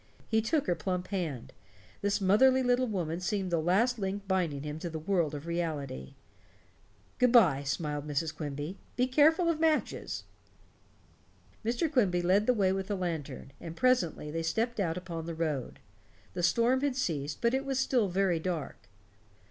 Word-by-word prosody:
He 220 0 +2
took 285 +6 0
her 180 - +2
plump 180 0 -3
hand; 165 - -4 0.5
this 200 +1 +1
motherly 255 +7 +4
little 250 +1 +2
woman 175 -6 -2
seemed 185 0 -2
the 170 - +2
last 220 +9 +2
link 195 0 -3
binding 170 -7 0
him 150 +1 -5
to 170 - -4
the 160 - -5
world 160 -2 0
of 145 +2 -7
reality. 155 - -4 1.0
"Good 250 -1 +4
by," 175 - +6
smiled 145 +1 -3
Mrs. 150 +2 -2
Quimby. 150 +4 -5 0.2
"Be 250 - +2
careful 310 +6 +4
of 330 -2 +1
matches." 320 -1 0 1.4
Mr. 235 +8 0
Quimby 200 - +2
led 195 +4 +3
the 250 - +5
way 195 -3 +3
with 190 0 -2
the 205 - -1
lantern, 155 -7 -4
and 165 -1 -8
presently 185 -12 +1
they 165 +1 -2
stepped 225 +8 -1
out 170 -3 0
upon 170 -3 -6
the 165 - -4
road. 155 -6 -2 0.6
The 180 - -3
storm 235 +9 +3
had 280 -3 0
ceased, 150 - -2
but 235 +1 +1
it 265 +1 +1
was 270 -1 -2
still 250 -5 +2
very 185 -2 +1
dark. 160 - -5
185 Hz, 170 wpm, -30 LUFS, 160-235 Hz, 1.4 s, by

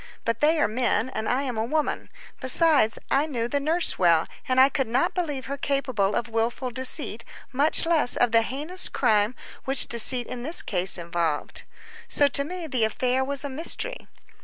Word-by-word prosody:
But 230 0 -1
they 310 +2 +2
are - - +2
men, 235 0 -1
and 220 -3 -4
I 260 +3 0
am 250 -5 -4
a - - 0
woman; 305 +6 -3 0.3
besides, 260 -3 +3
I 285 +3 +2
knew 235 -6 -3
the 285 +4 -1
nurse 325 +4 +1
well, 170 -2 +3 0.2
and 255 0 +2
I 265 - +7
could 270 -2 -2
not 240 +4 0
believe 295 -7 -4
her 280 +1 -5
capable 260 -8 -1
of 240 - -2
wilful 230 +3 -2
deceit, 260 +1 0 0.3
much 290 +6 +2
less 325 -6 +4
of 245 -1 +1
the 230 0 +4
heinous 295 +10 -2
crime 215 -1 +1 0.3
which 270 0 +3
deceit 240 +1 +2
in 250 0 -7
this 315 +7 0
case 185 -1 +1
involved. 170 -3 -3 0.4
So 285 - +4
to 280 - +1
me 350 +3 -7
the 255 -7 -1
affair 250 +4 0
was 280 +1 -1
a 285 - -5
mystery. 340 - -2
260 Hz, 185 wpm, -24 LUFS, 230-285 Hz, 0.4 s, I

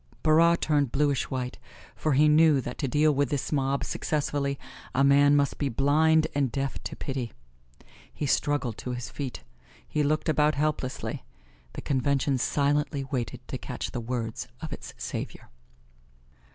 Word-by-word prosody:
Barras 165 +2 +5
turned 145 -5 +1
bluish 140 -2 +1
white, 125 -2 -4 0.4
for 155 - 0
he 150 +3 +5
knew 150 -1 +5
that 125 -1 -6
to 140 - 0
deal 150 +4 +3
with 140 0 +1
this 145 -4 -2
mob 140 -1 0
successfully 140 -2 -1 0.4
a 135 - +4
man 145 +1 +6
must 140 -1 +1
be 140 - 0
blind 155 +5 +3
and 140 -4 +1
deaf 135 +2 -3
to - - -4
pity. 130 -5 -4 0.8
He 150 - -4
struggled 140 -4 0
to 125 - -4
his 125 0 -6
feet 135 -4 -5 0.4
he 150 - -1
looked 150 +3 +1
about 150 -1 +3
helplessly 145 -3 -2 0.5
the - - -7
Convention 135 0 +1
silently 145 +1 +1
waited 130 -4 -4
to - - -4
catch - - -5
the 120 - -4
words 115 -1 -3
of - - -6
its - - -9
savior. - - -6
140 Hz, 155 wpm, -27 LUFS, 130-150 Hz, 0.8 s, man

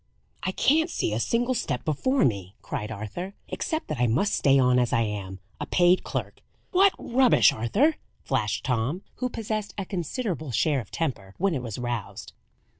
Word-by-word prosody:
"I 180 +2 -1
can't 320 - +3
see 110 - -1
a 110 - 0
single 240 - +1
step 245 - -2
before 250 - +2
me," 100 -4 -2
cried 105 - -4
Arthur. 115 - -6
"Except 320 -4 -3
that 155 -4 -4
I 125 - +3
must 145 - +1
stay 140 -2 +4
on 125 -1 +4
as 120 -1 +1
I 115 - +3
am, 100 -3 -4 0.2
a - - -4
paid 180 0 +4
clerk." - - -4 0.3
"What 390 +1 +5
rubbish, 250 +1 +4
Arthur!" 220 - +2 0.3
flashed 110 -4 -1
Tom, 130 - -1
who 250 - -1
possessed 215 -3 -4
a 200 - -3
considerable 175 - -3
share 140 +5 +2
of 110 - -8
temper 105 -12 -3
when 195 0 +1
it 135 - -2
was 115 -4 -5
roused. 120 -4 -4
150 Hz, 180 wpm, -26 LUFS, -, 0.3 s, What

